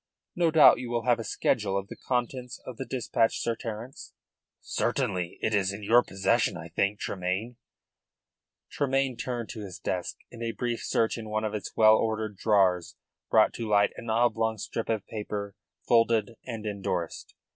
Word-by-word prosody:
No 175 -2 +3
doubt 155 -6 +7
you 125 -1 -5
will 120 -1 -1
have 120 -2 +3
a - - -3
schedule 100 -3 0
of 100 0 -3
the - - -8
contents 125 0 -3
of 125 -3 -8
the 135 - -5
dispatch, 115 -2 +1
Sir 115 - -1
Terence?" 115 +4 -7 0.5
"Certainly. 90 -2 -1
It 110 - +1
is 100 -2 +2
in 100 +1 -7
your 120 +4 +6
possession, 95 -4 +1
I - - -8
think, 100 +1 0
Tremayne." 95 +6 -3 1.1
Tremayne 135 -2 0
turned 120 -2 -4
to 110 - -6
his 95 -2 -8
desk, 90 -2 -3
and 115 - -10
a 115 -1 -2
brief 120 0 -3
search 115 +1 +1
in 110 -1 -7
one 110 0 -1
of 110 -1 -2
its 105 - -5
well 110 0 +7
ordered 110 -2 -1
drawers 95 -5 +2 0.3
brought - - +5
to 115 -2 -4
light 100 -1 +4
an 115 - -8
oblong 110 -1 +2
strip 110 +2 -4
of 110 -4 -1
paper 105 -2 -5 0.3
folded 115 -2 +3 0.2
and 115 -3 -5
endorsed. 95 -5 -3
110 Hz, 175 wpm, -28 LUFS, 100-120 Hz, 1.1 s, doubt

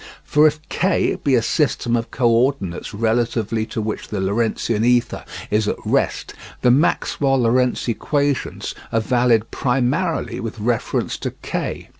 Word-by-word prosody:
For 150 +1 +4
if 155 +2 -3
K 190 +1 +1
be 140 -2 +3
a 115 - +2
system 120 -3 +1
of 115 -1 -2
co 125 - +1
ordinates 115 -6 +1
relatively 115 0 0
to 110 - -3
which 110 0 -4
the 105 - -4
Lorentzian 110 +2 0
ether 120 0 +2 0.3
is 105 0 +2
at - - 0
rest, - - 0 0.3
the 125 - +6
Maxwell 135 -1 +2
Lorentz 125 +2 +1
equations 140 +3 -1 0.2
are 115 - +2
valid 115 -1 +2
primarily 135 +7 0
with 115 0 -5
reference 115 +2 -1
to - - -2
K. - - -4
120 Hz, 145 wpm, -20 LUFS, 110-135 Hz, 0.3 s, the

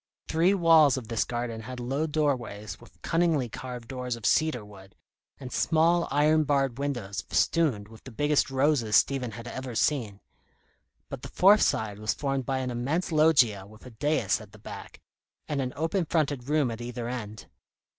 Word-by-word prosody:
Three 170 +5 +3
walls 160 -6 +5
of 115 -4 -7
this 115 -2 +1
garden 120 -2 -4
had 125 +2 -8
low 135 +6 -1
doorways 125 -9 -2
with 120 - -18
cunningly 165 -6 +1
carved 125 0 -7
doors 125 -2 -4
of 115 -2 -9
cedar 155 -9 +2
wood, 95 -2 -15 0.4
and 130 -3 -8
small, 170 +1 +2
iron 150 +3 +3
barred 135 -3 0
windows 120 -9 -3
festooned 135 -12 +1
with 110 0 -15
the 130 - -9
biggest 145 +5 +1
roses 135 -5 +1
Stephen 130 -3 +2
had 115 +3 -9
ever 130 -1 -6
seen; 110 -5 0 0.9
but - - -7
the - - -7
fourth 200 +4 +5
side 105 -2 0
was 110 0 -1
formed 135 -3 -2
by 135 - 0
an 130 -1 -2
immense 140 +10 -2
loggia 135 -11 +3
with 110 +3 -16
a 125 - -10
dais 115 -4 0
at 105 -1 -14
the - - -13
back, 105 - -10 0.5
and 145 -2 -1
an 125 -1 -3
open 165 +4 -1
fronted 145 -5 -1
room 150 -5 +2
at 115 +1 -7
either 120 0 -5
end. 110 -4 -6
130 Hz, 175 wpm, -27 LUFS, 115-150 Hz, 0.9 s, walls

